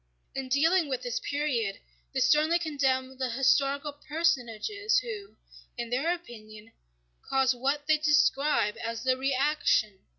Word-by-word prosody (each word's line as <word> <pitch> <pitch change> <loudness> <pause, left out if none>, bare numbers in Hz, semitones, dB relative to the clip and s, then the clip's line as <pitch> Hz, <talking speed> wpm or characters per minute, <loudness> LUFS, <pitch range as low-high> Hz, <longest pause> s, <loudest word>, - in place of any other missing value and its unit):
In 265 -1 -5
dealing 320 +4 +3
with 255 -2 -3
this 245 -2 -2
period 265 -9 -2 0.3
they - - -1
sternly 310 +3 +4
condemn 265 -5 -1
the 260 -1 -1
historical 275 +3 +1
personages 320 - -1
who, 420 -4 -4 0.4
in 235 -1 -5
their 275 +7 +1
opinion, 225 -10 -9 0.6
caused 265 -1 +3
what 275 +4 -1
they 310 0 +3
describe 290 -6 +2
as 230 0 -4
the 260 0 +2
reaction. 265 -6 +1
275 Hz, 130 wpm, -28 LUFS, 245-305 Hz, 0.6 s, sternly